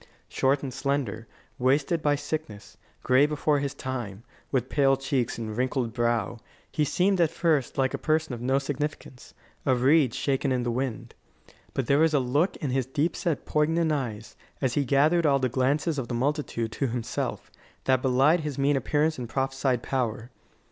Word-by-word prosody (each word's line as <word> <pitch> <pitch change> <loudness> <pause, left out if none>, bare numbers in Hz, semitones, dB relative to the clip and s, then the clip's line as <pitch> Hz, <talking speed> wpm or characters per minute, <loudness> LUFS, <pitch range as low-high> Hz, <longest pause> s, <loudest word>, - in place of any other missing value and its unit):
Short 135 +2 +1
and 130 -2 -4
slender, 130 -5 -2 0.3
wasted 140 +6 +2
by 145 -1 +2
sickness, 140 -9 -5 0.3
gray 130 +3 +4
before 150 -1 +1
his 140 -1 -3
time, 120 -6 -5 0.3
with 130 -3 0
pale 135 -1 +3
cheeks 135 -3 -1
and 110 -2 -5
wrinkled 125 -1 -1
brow, 120 -2 0 0.3
he 150 - +1
seemed 185 +5 +2
at 165 - +4
first 165 -5 0
like 130 -1 +1
a - - -3
person 155 -3 0
of 120 - -6
no 130 +2 +2
significance 140 -2 -5 0.3
a 130 -3 +3
reed 130 0 +3
shaken 135 0 0
in 125 -1 0
the 120 - -1
wind. 125 -1 -3 0.6
But 135 - 0
there 140 +4 +3
was 160 -1 +3
a - - +4
look 140 +8 +1
in 145 -6 -3
his 130 -1 0
deep 145 +5 0
set, 165 -5 -2
poignant 160 +2 +1
eyes, 115 -7 -4 0.2
as 130 -3 0
he 140 0 +1
gathered 150 +5 +3
all 140 -1 +4
the 130 -2 0
glances 140 +5 0
of 125 - -4
the 120 - -3
multitude 130 -3 -1
to 135 - -1
himself, 120 -1 -4 0.3
that 130 -1 +2
belied 135 +6 +4
his 150 -3 -4
mean 140 +1 +2
appearance 150 +2 0
and 120 -2 -5
prophesied 135 -2 -1
power. 120 -2 -2
135 Hz, 180 wpm, -27 LUFS, 125-150 Hz, 0.6 s, gray